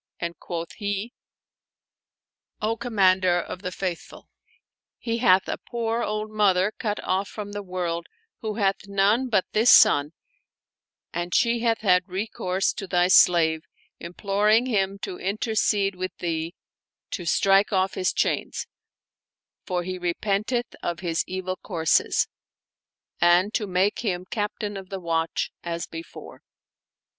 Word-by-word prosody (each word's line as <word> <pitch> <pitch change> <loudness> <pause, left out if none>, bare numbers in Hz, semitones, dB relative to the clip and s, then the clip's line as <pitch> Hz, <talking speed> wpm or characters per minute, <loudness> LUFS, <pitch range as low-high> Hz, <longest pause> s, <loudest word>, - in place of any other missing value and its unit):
" - - -58
and 170 0 -4
quoth 170 -1 -5
he, 205 +2 -3 0.7
" - - -65
O 225 - 0
Commander 190 -6 +2
of 180 +1 -6
the 180 -2 -4
Faith 180 -2 -3
ful, - - -15 0.7
he 230 0 -3
hath 190 -5 +4
a - - -3
poor 230 -1 -2
old 215 0 -3
mother 205 -1 +2
cut 210 -2 -2
off 190 +2 0
from 205 -1 -7
the 205 0 -4
world 180 -3 -3 0.3
who 215 -3 -4
hath 200 -1 0
none 200 +6 +2
but 200 -5 +2
this 225 +3 +3
son 145 +2 +6 1.0
and 175 +1 -2
she 235 0 +3
hath 230 -1 +1
had 180 -3 +3
recourse 190 -1 -1
to 195 - -6
thy 180 0 +3
slave, 165 -3 +5 0.4
imploring 205 +6 +1
him 200 -5 0
to 185 -2 -6
intercede 205 0 0
with 185 0 -5
thee 165 0 -3 0.6
to 185 - -4
strike 195 +4 +3
off 190 -1 +1
his 185 - 0
chains, - - -1 1.0
for 180 -1 -1
he 185 +1 -5
repenteth 205 +7 -1
of 175 -1 -3
his 165 -3 0
evil 185 0 -4
courses; 165 -5 +1 0.9
and 175 +4 +4
to 210 - -1
make 185 +2 +1
him 185 -5 -2
Captain 205 0 -3
of 190 -1 -9
the 195 - -5
Watch 165 -2 -1
as 170 -1 -4
before." 165 0 -10
190 Hz, 140 wpm, -25 LUFS, 180-210 Hz, 1.0 s, son